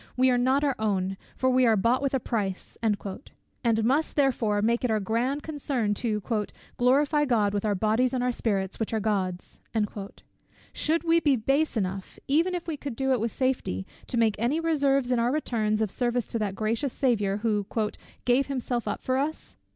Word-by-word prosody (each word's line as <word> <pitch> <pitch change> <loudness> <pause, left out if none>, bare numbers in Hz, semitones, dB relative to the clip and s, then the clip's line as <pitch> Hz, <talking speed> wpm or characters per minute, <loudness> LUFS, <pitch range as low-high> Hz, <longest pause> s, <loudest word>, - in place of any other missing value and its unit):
"We 260 0 +4
are 245 - +3
not 260 +3 +2
our 280 -2 +2
own; 195 -3 0 0.2
for 260 0 +1
we 255 0 +4
are 220 -1 +4
bought 235 +6 +2
with 275 -1 0
a - - +2
price," 200 -6 -3
and 215 -3 +2 0.9
must 275 +7 +1
"therefore" 240 -7 +2
make 235 +3 +1
it 250 - +1
our 220 -1 +2
grand 240 +8 -1
concern 275 -8 -1
to 210 -1 -2 0.5
"glorify 285 +4 +3
God 215 -6 +2
with 205 - -1
our 205 -1 +1
bodies 220 +5 +2
and 255 -1 -1
our 250 - +2
spirits, 195 -5 -2
which 225 0 -1
are - - +1
God's." 190 -4 -2 1.1
Should 325 +2 0
we 335 0 +4
be 290 -4 +3
base 270 +4 +1
enough, 190 -1 -3
even 330 +6 +2
if 345 - -4
we 320 -3 -3
could 280 -4 -6
do 265 +2 0
it 255 - +3
with 225 +1 -1
safety, 250 - -1 0.2
to 240 - -2
make 225 -2 +3
any 250 +8 +1
reserves 280 -5 +1
in 245 - +2
our 235 +1 +2
returns 220 -7 0
of 215 -3 +1
service 245 -1 0
to 230 - -1
that 200 -2 -2
gracious 225 +6 -1
Saviour, 205 -7 +1
who 210 -2 0 0.6
"gave 250 +3 +3
up - - -19
himself 250 -3 -2 0.2
for 260 0 0
us?" 305 +3 -4
245 Hz, 195 wpm, -27 LUFS, 215-275 Hz, 1.1 s, We